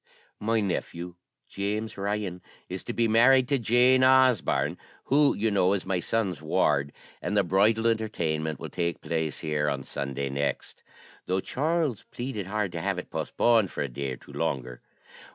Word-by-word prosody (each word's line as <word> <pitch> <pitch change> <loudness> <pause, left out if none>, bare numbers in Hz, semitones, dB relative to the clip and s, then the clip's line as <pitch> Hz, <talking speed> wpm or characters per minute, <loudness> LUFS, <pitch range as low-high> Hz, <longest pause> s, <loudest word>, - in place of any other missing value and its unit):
My 110 +1 +1
nephew, 90 -2 -3 0.3
James 105 +2 -3
Ryan, 100 -2 -3 0.3
is 95 +1 -6
to - - -3
be 115 -1 +1
married 125 +3 +5
to 140 -2 +2
Jane 125 +3 +4
Osborne 130 -4 +3 0.2
(who, 145 +1 +3
you 110 +2 0
know, 95 -1 +3
is 100 - -2
my 95 -1 0
son's 95 -5 -1
ward), 70 -2 +1 0.3
and 105 - -1
the 100 - +4
bridal 105 +5 +2
entertainment 85 -9 -1
will - - -6
take 85 -1 -2
place 80 -3 -2
here 75 -2 0
on 70 -2 -3
Sunday 70 0 -4
next, 70 -1 -3 0.5
though 95 +1 +1
Charles 150 - -1
pleaded 120 -6 -5
hard 105 -2 -1
to 85 - -4
have - - -1
it - - -7
postponed 115 -5 +2
for - - -3
a - - -2
day 70 +1 -4
or - - -8
two - - -15
longer. 60 -2 -3
100 Hz, 170 wpm, -27 LUFS, 80-115 Hz, 0.5 s, married